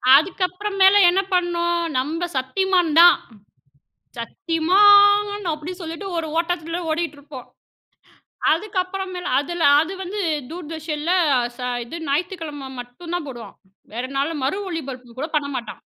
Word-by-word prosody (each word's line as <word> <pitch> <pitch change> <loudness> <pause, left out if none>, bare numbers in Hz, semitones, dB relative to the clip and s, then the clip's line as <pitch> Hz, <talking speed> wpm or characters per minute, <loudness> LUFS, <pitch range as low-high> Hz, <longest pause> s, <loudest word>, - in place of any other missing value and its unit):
அதுக்கப்புறம் 370 +5 0
மேல 380 +1 +7
என்ன 375 +2 +2
பண்ணோம் 345 -1 +1 0.2
நம்ப 320 +7 -1
சத்திமான் 355 +5 +1
தான். 350 - +8 1.0
சத்திமான் 405 - +4
அப்டின்னு 325 +5 -7
சொல்லிட்டு 330 +4 -6
ஒரு 330 -1 -2
ஓட்டத்தில 335 0 -2
ஓடிகிட்டிருப்போம். 295 -5 -5 1.1
அதுக்கப்புறம் 380 +1 -2
மேல் 360 - -5
அதில 335 +4 -3 0.2
அது 330 +4 -4
வந்து 400 +3 -4 0.3
தூர்தர்ஷனில, 315 -1 -4 0.5
ச - - -24 0.3
இது 330 - -7
ஞாயித்திக்கிழம 300 -3 -3
மட்டும் 245 +8 -9
தான் 345 -4 -4
போடுவான். 240 -3 -10 0.4
வேற 240 +3 -3
நாள்ல 285 +4 0
மறு 275 +9 0
ஒலிபரப்பு 260 -7 -7
கூட 305 +4 -3
பண்ண 285 -1 -3
மாட்டான். 235 - -8
335 Hz, 120 wpm, -22 LUFS, 295-370 Hz, 1.1 s, தான்